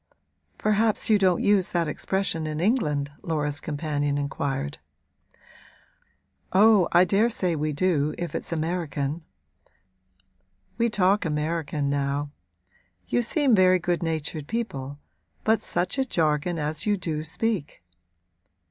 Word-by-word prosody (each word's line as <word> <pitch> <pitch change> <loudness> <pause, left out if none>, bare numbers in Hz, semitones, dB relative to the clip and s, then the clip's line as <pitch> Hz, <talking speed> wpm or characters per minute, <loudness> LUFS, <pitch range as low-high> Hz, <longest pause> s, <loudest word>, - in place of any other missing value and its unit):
'Perhaps 215 +1 +1
you 210 - +5
don't 185 -3 +2
use 200 -3 +3
that 170 -2 0
expression 165 0 -1
in 155 0 -3
England?' 150 - 0
Laura's 150 -3 -1
companion 145 -2 -2
inquired. 135 - -3 1.7
'Oh, 205 -1 +5
I 175 +1 +6
daresay 195 -1 +1
we 155 -1 -1
do, 155 -2 +1
if 175 -4 -4
it's - - -5
American; 160 -2 -2 1.6
we 235 0 +3
talk 200 -1 +2
American 155 -2 -2
now. 140 +1 -1 0.8
You 245 - +2
seem 275 +2 +2
very 185 -2 +5
good 175 -1 -1
natured 160 -2 -3
people, 145 - -4 0.5
but 220 +1 +2
such 180 +9 -2
a - - +4
jargon 160 - 0
as 155 +6 -2
you 205 -1 +2
do 160 -4 -3
speak!' 160 - -3
165 Hz, 120 wpm, -25 LUFS, 150-195 Hz, 1.7 s, I